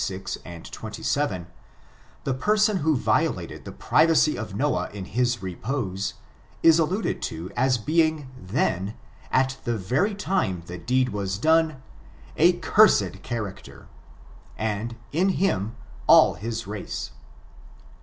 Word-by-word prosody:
ix, 95 -1 -5
25, 85 -1 -10
26, - - -7 0.4
27, 100 -12 -1 0.8
the 135 - 0
person 210 - +2
who 155 -3 +2
violated - - -1
the - - -7
privacy 160 -1 +3
of 110 -4 -6
Noah 145 +7 0
in 100 -2 -7
his 120 -1 0
repose, 95 +1 -3 0.5
is 165 0 +7
alluded 185 +7 0
to 80 +3 -5
as 130 -1 +2
being 155 +3 +1 0.2
theuy 95 0 -1 0.4
at 130 0 +2
the 120 -1 -1
very 135 - 0
time 95 - -1
the 90 0 -7
deed 125 +6 +1
was 100 -1 -3
done, 160 +1 +2 0.5
a 175 +3 +5
cursed 140 - +3
character, 110 -5 -6 0.7
and, 110 +2 -2 0.2
in 180 +6 +2
him, 115 - 0 0.3
all - - +7
his 115 +2 -5
race. 105 - -5
120 Hz, 125 wpm, -25 LUFS, 100-155 Hz, 0.8 s, is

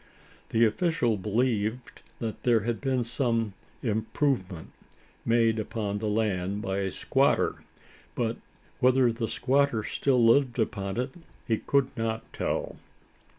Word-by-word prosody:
The 115 +1 +4
official 120 -1 +1
believed 110 +3 -1 0.2
there 115 0 +1
had 115 +1 -2
been 130 -3 +1
some 115 -3 0 0.3
"improvement" 110 - -1 0.5
made 115 -1 +3
upon 105 -1 -3
the 110 - -2
land 105 -2 0
by 95 -3 -1
a 95 -1 -1
squatter; - - +1 0.5
but 115 -1 -1 0.4
whether 130 -1 +4
the 115 0 -3
squatter 135 -3 +1
still 125 -1 +2
lived 125 +1 +4
upon 100 -3 -2
it, 125 +2 -1 0.4
he 110 -3 +1
could 140 -2 +1
not 115 -1 -2
tell. - - -2
115 Hz, 120 wpm, -28 LUFS, 105-125 Hz, 0.5 s, The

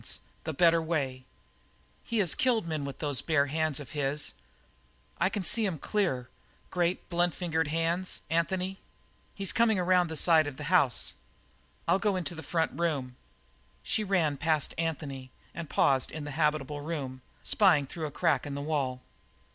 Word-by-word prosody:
"Bare - - -3
hands - - -2 0.3
the 160 - -2
better 165 +2 +5
way!" 135 -6 -2 0.8
"He 230 - -3
has 190 -7 +2
killed 235 -7 +1
men 155 -3 -2
with 140 - -6
those 145 -4 0
bare 155 -4 +2
hands 155 0 0
of 135 -5 -9
his. 145 0 0 0.9
I 185 - +3
can 205 -1 -3
see 220 +5 +2
'em 175 -4 -3
clear 145 - -1 0.4
great, 175 0 0
blunt 175 -1 +1
fingered 160 -3 0
hands, 165 +4 -1
Anthony. 185 +4 0 0.6
He's 195 -2 -2
coming 230 -3 +3
around 180 -1 +3
the 160 -1 -4
side 160 -1 +5
of 140 -2 -6
the 150 - -6
house. 140 -9 +4 0.7
I'll 175 +3 +4
go 205 -2 +1
into 175 -3 -2
the 160 - -7
front 165 0 0
room." 140 -7 -1 0.7
She 215 - 0
ran 175 -8 +1
past 155 0 +1
Anthony 145 -5 -3 0.2
and 165 -3 -6
paused 135 -2 +3
in 155 - -6
the 145 - -5
habitable 150 -1 0
room, 140 -5 -4 0.2
spying 180 -9 +4
through 155 +3 -5
a - - -5
crack 165 -1 +1
in 140 - -4
the - - -3
wall. 135 -4 -1
160 Hz, 170 wpm, -29 LUFS, 145-175 Hz, 0.9 s, better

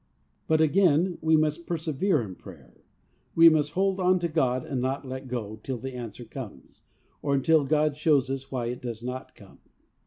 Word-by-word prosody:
But 160 0 +3
again, 175 +1 +3
we 160 0 +4
must 155 +2 -1
persevere 165 -1 0
in 95 -4 -7
prayer. 60 -7 -15 0.5
We 165 0 +9
must 150 -2 +1
hold 195 +1 +1
on 185 0 +3
to 170 - +1
God, 130 -6 0
and 130 -3 -3
not 135 +2 -2
let 130 +1 -6
go 110 -4 -5
till 130 +1 -4
the 130 +3 -6
answer 120 -1 -7
comes, 115 -2 -10 0.4
or 140 -1 +1
until 150 +2 +3
God 150 0 +2
shows 145 -4 +2
us 135 0 -5
why 125 -3 -2
it 125 - -5
does 120 -2 -6
not 125 +1 -6
come. - - -17
140 Hz, 185 wpm, -27 LUFS, 125-160 Hz, 0.5 s, We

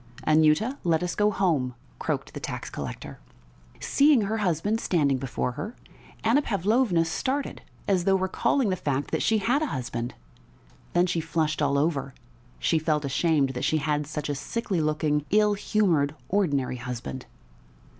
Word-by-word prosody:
"Anyuta, 155 - +3
let 170 0 +2
us 175 -1 -1
go 210 0 +3
home," 155 -12 0 0.2
croaked - - -3
the - - -5
tax - - -5
collector. - - -7 0.6
Seeing 285 -3 +4
her 215 +2 -1
husband 205 +3 0
standing 140 -7 +2
before 125 -1 -2
her, 215 - -6 0.5
Anna 235 +6 +4
Pavlovna 205 - +2
started 270 - -2 0.3
as 185 -3 +2
though 195 - +4
recalling 190 +6 +1
the 185 - +1
fact 145 -5 -2
that - - 0
she 220 - +3
had 245 +8 +1
a 310 - 0
husband; 120 - -4 0.8
then 175 +1 +4
she 175 -2 -1
flushed 155 -1 -1
all 140 -1 +2
over: 140 -3 0 0.4
she 165 - +1
felt 155 -2 0
ashamed 140 0 +2
that 125 -1 -4
she 155 - +2
had 150 -1 -1
such 150 0 -4
a 145 - -1
sickly 185 +4 -2
looking, 150 -1 +1
ill 210 0 +4
humoured, 175 -9 +1
ordinary 145 -11 +1
husband. 125 +1 -6
165 Hz, 155 wpm, -26 LUFS, 145-205 Hz, 0.8 s, Seeing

